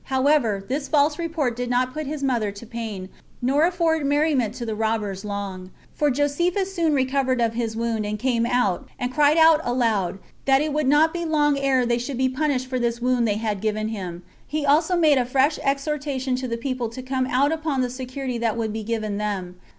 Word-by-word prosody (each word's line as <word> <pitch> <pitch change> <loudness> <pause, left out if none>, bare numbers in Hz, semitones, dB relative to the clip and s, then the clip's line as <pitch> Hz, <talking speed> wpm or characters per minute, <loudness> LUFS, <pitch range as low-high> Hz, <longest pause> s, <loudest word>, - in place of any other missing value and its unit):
However, 260 -7 +2
this 275 +3 -2
false 295 +1 +2
report 320 -8 -1
did 245 0 -3
not 250 +1 +1
put 305 -2 -4
his 295 -1 -4
mother 235 -6 0
to 200 +3 -11
pain, 220 -5 -6 0.3
nor 275 +6 +3
afford 335 -3 +1
merriment 285 -5 +1
to 240 - -5
the 220 - -2
robbers, 215 -3 -2
long; 200 -3 -5 0.2
for 295 - +1
Josephus 345 +8 0
soon 330 -5 +1
recovered 260 -1 +1
of 230 -1 +1
his 230 -1 -2
wound, 230 -2 -1
and 210 0 -3
came 235 0 0
out, 240 -8 0
and 250 +1 -3
cried 300 +2 +4
out 320 -1 +6
aloud, 225 -7 0 0.3
That 270 0 +5
it 300 0 -1
would 300 -2 0
not 300 +3 +4
be 345 -1 -3
long 300 -3 +2
ere 270 -2 +2
they 240 0 +1
should 250 +1 -4
be 260 0 +2
punished 265 -1 0
for 255 -1 -3
this 235 -1 -1
wound 245 -1 +1
they 205 - +1
had 215 -3 -2
given 215 0 -1
him. 180 -5 -6 0.2
He 305 0 -2
also 320 +5 +3
made 305 -5 +4
a 245 - +1
fresh 270 +4 +2
exhortation 275 -2 -1
to 255 0 -3
the 230 -1 -3
people 250 -1 -3
to 255 +3 -8
come 260 0 -1
out 275 +3 +2
upon 310 -4 -1
the 250 - 0
security 255 -1 -4
that 230 -1 0
would 220 -2 -2
be 220 - -3
given 215 -2 -3
them. 190 -4 -4
255 Hz, 210 wpm, -23 LUFS, 225-290 Hz, 0.3 s, out